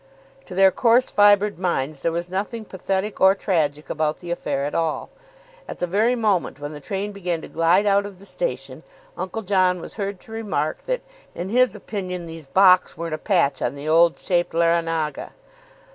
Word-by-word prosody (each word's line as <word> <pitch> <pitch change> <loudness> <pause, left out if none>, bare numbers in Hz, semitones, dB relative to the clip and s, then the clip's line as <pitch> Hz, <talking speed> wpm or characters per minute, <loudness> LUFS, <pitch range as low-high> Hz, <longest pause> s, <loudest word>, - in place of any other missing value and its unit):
To 180 - -8
their 190 0 +6
coarse 240 +5 +3
fibred 205 -2 +4
minds 155 -6 -2
there 165 - 0
was 170 +1 -3
nothing 205 +5 -4
pathetic 195 +2 -3
or 190 +1 +6
tragic 155 -7 -1
about 155 0 -1
the 175 -1 -8
affair 140 -5 -2
at 145 - -4
all. 165 -2 -1 0.6
(At - - -7
the - - -1
very 215 +7 +2
moment 205 - 0
when 145 +1 -6
the 150 - -8
train 195 +7 -4
began 180 -4 -3
to - - -9
glide 170 +5 +2
out 200 0 +3
of 200 -2 -12
the 195 - -14
station - - -4 0.3
Uncle 220 +4 -4
John 185 -2 +2
was - - -9
heard 200 -2 -3
to - - -16
remark 200 -9 -2
that, - - -1 0.3
in 180 +2 -4
his 250 -1 +3
opinion, 185 -4 -5
these 165 -3 -9
Bocks 185 +3 +4
weren't 165 -1 -4
a 155 - -3
patch 160 -9 +1
on - - -1
the 145 +2 -7
old 165 +2 +4
shaped 175 -2 0
Larranaga.) 165 -2 0
180 Hz, 190 wpm, -23 LUFS, 165-200 Hz, 0.6 s, their